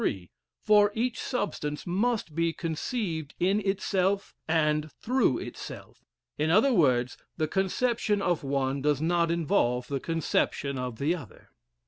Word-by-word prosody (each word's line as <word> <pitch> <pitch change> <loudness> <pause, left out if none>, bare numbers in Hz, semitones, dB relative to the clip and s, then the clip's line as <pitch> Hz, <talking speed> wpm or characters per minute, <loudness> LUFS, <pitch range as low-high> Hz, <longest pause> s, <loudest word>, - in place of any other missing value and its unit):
three; 90 -3 -2 0.3
for 210 -1 +5
each 240 +2 -1
substance 175 - -3
must 205 -1 0
be 165 +1 +1
conceived 165 - -3
in 190 +4 +2
itself 195 -1 0
and 155 -1 +1
through 255 +3 +1
itself; - - -9 0.4
in 155 +1 +1
other 220 +10 +5
words, 130 - +2 0.2
the 155 -2 0
conception 210 +4 0
of 175 -5 0
one 135 0 -1
does 145 -1 +2
not 170 +1 +2
involve 160 -8 +1
the 140 -1 -1
conception 145 -3 -1
of 125 -3 -4
the 150 +7 +1
other. 145 - -12
165 Hz, 135 wpm, -28 LUFS, 145-200 Hz, 0.4 s, for